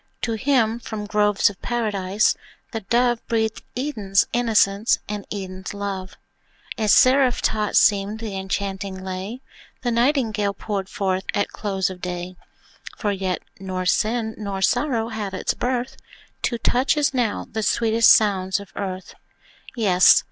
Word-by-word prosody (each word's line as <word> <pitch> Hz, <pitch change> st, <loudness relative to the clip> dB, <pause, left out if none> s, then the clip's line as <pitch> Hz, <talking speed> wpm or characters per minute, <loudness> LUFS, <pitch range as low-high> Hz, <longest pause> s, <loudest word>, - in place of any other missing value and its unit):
To 230 Hz, -, 0 dB
him, 235 Hz, -1 st, +1 dB
from 215 Hz, -3 st, -6 dB
groves 210 Hz, 0 st, +3 dB
of 195 Hz, -, -18 dB
Paradise, 210 Hz, -4 st, +1 dB, 0.4 s
the 225 Hz, -, -3 dB
Dove 240 Hz, +3 st, +1 dB
Breathed 220 Hz, -1 st, 0 dB, 0.2 s
Eden's 220 Hz, -8 st, +1 dB
innocence 220 Hz, -3 st, +3 dB
and 205 Hz, -1 st, -5 dB
Eden's 190 Hz, -1 st, -6 dB
love; 195 Hz, -2 st, -5 dB, 0.6 s
And 215 Hz, -1 st, -1 dB
seraph 260 Hz, +1 st, +5 dB
taught 215 Hz, -1 st, 0 dB
seemed 205 Hz, 0 st, +3 dB
the 220 Hz, -3 st, -5 dB
enchanting 190 Hz, 0 st, -3 dB
lay 190 Hz, +6 st, -5 dB, 0.4 s
The 240 Hz, -, 0 dB
Nightingale 230 Hz, -5 st, +1 dB
poured 195 Hz, -2 st, -4 dB
forth 190 Hz, -1 st, -1 dB
at 205 Hz, -, +1 dB
close 195 Hz, -2 st, -2 dB
of 180 Hz, -1 st, -10 dB
day; 180 Hz, 0 st, -5 dB, 0.6 s
For 210 Hz, -, -1 dB
yet 190 Hz, -2 st, -2 dB, 0.2 s
nor 185 Hz, -1 st, -4 dB
sin 220 Hz, +4 st, +1 dB
nor 200 Hz, -2 st, -4 dB
sorrow 230 Hz, 0 st, +1 dB
had 210 Hz, -4 st, -4 dB
its -, -, -1 dB
birth, 255 Hz, +1 st, -2 dB, 0.4 s
To 240 Hz, -, 0 dB
touch, 255 Hz, +6 st, +1 dB
as 290 Hz, -2 st, +2 dB
now, 240 Hz, -5 st, 0 dB
the 220 Hz, -, -2 dB
sweetest 225 Hz, +1 st, +4 dB
sounds 190 Hz, -3 st, +3 dB
of 200 Hz, -1 st, -12 dB
earth. 190 Hz, -2 st, -5 dB, 0.6 s
Yes! 190 Hz, -6 st, +6 dB
210 Hz, 140 wpm, -23 LUFS, 195-230 Hz, 0.6 s, Yes